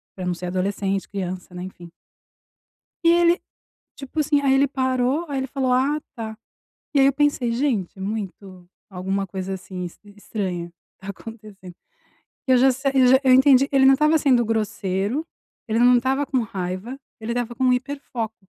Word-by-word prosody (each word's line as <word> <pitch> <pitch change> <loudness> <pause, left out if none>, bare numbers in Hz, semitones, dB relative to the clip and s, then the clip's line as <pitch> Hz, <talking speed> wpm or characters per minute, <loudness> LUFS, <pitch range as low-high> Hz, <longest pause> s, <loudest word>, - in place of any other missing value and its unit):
pra 185 -1 -5
não 180 - 0
ser 180 +1 -6
adolescente, 195 +1 -2
criança, 185 -2 -5
né, 180 - -7
enfim. 175 -2 -10 1.1
E - - +5
ele, 345 +1 +4 0.6
tipo 275 +3 -8
assim, 290 -1 +2
aí 270 -1 +3
ele 275 +1 +4
parou, 260 +3 0
aí 275 -1 -2
ele 265 - -2
falou: 260 -1 -1
"Ah, 280 +4 +2 0.2
tá." 220 -1 -6 0.6
E 280 - +3
aí 270 - +6
eu 275 - +4
pensei: 285 -5 +1
"Gente, 230 -8 -1
muito, 190 -3 -6 0.2
alguma 195 +1 -2
coisa, 190 +1 -5
assim, 185 -1 -6
es 175 - -9
estranha 195 -4 -5 0.3
tá 190 - -12
acontecendo." 205 -4 -10 0.7
E - - +3
eu 255 - +6
já 265 +1 +5
sa 270 +2 -1
eu 260 -2 +5
já 260 +1 +6
eu 260 -1 +5
entendi, 265 +1 +6
ele 270 -1 +4
não 270 0 +7
tava 305 +2 +3
sendo 250 -5 +3
grosseiro, 210 - -1 0.4
ele 225 +1 0
não 245 0 +6
tava 265 +3 0
com 260 -1 0
raiva, 195 +4 -5 0.2
ele 225 +2 -3
tava 240 -1 -3
com 260 - -2
um 250 -1 +4
hiperfoco, 250 -4 -4
235 Hz, 180 wpm, -23 LUFS, 195-270 Hz, 1.1 s, não